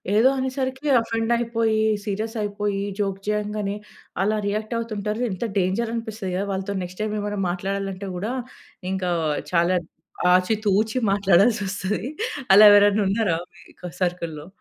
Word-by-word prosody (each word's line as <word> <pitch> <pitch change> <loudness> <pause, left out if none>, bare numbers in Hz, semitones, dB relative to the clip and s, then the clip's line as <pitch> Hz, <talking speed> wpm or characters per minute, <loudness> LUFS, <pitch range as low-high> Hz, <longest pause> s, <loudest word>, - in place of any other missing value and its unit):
ఏదో 240 +5 +6
అనేసరికి, 260 +1 -3
ఆఫెండ్ 225 0 -2
అయిపోయి, 225 -2 0 0.2
సీరియస్ 215 +3 -3
అయిపోయి, 205 -1 -2 0.2
జోక్ 195 -1 -1
చేయంగానే, 210 -1 -1 0.5
అలా 215 +2 +1
రియాక్ట్ 215 +3 -2
అవుతుంటారు. 215 0 -3
ఎంత 185 +5 -4 0.2
డేంజర్ 210 +6 0
అనిపిస్తది 220 -4 -4
గదా! 195 +2 -1
వాళ్ళతో 195 +1 -3
నెక్స్ట్ 180 +3 -9
టైమ్ 215 0 -1
ఏమైనా 205 0 -3
మాట్లాడాలంటే, 195 +1 -3
కూడా 210 +6 -3 0.6
ఇంకా 185 -2 -1 0.4
చాలా 175 +1 +3 0.6
ఆచి 185 +4 +2
తూచి 215 +5 +2
మాట్లాడాల్సి 200 +3 +4
వొస్తది. 195 +3 -3 0.5
అలా 205 +2 +9
ఎవరైనా 205 +1 +5
ఉన్నారా 200 -5 +1 0.2
మీ - - -16 0.4
సర్కిల్‌లో? 170 -3 -2
205 Hz, 130 wpm, -23 LUFS, 190-220 Hz, 0.6 s, అలా